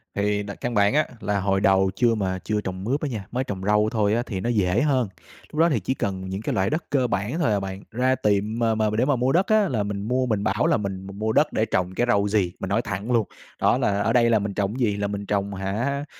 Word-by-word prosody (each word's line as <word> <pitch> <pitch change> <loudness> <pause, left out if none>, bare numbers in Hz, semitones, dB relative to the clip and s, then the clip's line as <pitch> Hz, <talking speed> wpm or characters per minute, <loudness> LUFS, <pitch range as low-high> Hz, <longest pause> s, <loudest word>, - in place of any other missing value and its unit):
Thì 105 0 0
là 100 0 -7
căn 120 - -4
bản 100 0 +3
á 155 +1 +2
là 105 -2 -1
hồi 95 0 +1
đầu 95 -1 +3
chưa 120 -2 +3
mà 95 -3 -2
chưa 105 -1 -1
trồng 95 -1 -5
mướp 130 +8 -1
á 150 - -1
nha, 110 -6 -5
mới 125 +2 -1
trồng 95 -6 -5
rau 105 +1 +3
thôi 105 -2 +1
á 120 +2 +1
thì 100 -7 -4
nó 115 - -2
dễ 100 -2 +2
hơn. 130 -7 +1 0.4
Lúc 150 - -5
đó 165 +1 +5
thì 135 -8 +1
chỉ 100 +7 -1
cần 95 -6 -3
những 95 +2 -4
cái - - -2
loại 95 0 +1
đất 155 +3 -1
cơ 130 -3 +2
bản 105 - -2
thôi 155 -10 +2
à 100 - +2
bạn 95 0 -6
ra 130 +3 +2
tiệm 105 0 0
mà 115 -1 +2
mà 110 -1 +1
để 120 - +3
mà 145 0 +2
mua 125 +2 +1
đất 180 +5 +2
á 215 -2 +3
là 115 -6 0
mình 100 -1 -4
mua 130 +2 +1
mình 110 -5 -1
bảo 105 +10 +1
là 165 - +3
mình 95 -2 -5
m 100 +1 -9
mua 110 +1 0
đất 150 +6 +2
để 110 - +1
trồng 90 -3 -1
cái 120 - +1
rau 100 -3 +3
gì, 100 -4 +1
mình 95 - -4
nói 100 +4 +2
thẳng 105 +1 -4
luôn. 115 -4 +2 0.3
Đó - - +4
là 100 0 +1
ở 115 +2 +1
đây 120 -1 +4
là 115 -2 +4
mình 100 0 -3
trồng 100 +5 -2
gì, 105 -5 +1
là 100 0 -1
mình 100 0 -4
trồng 100 0 -1
hả 115 +10 -2
105 Hz, 290 wpm, -24 LUFS, 100-120 Hz, 0.4 s, đó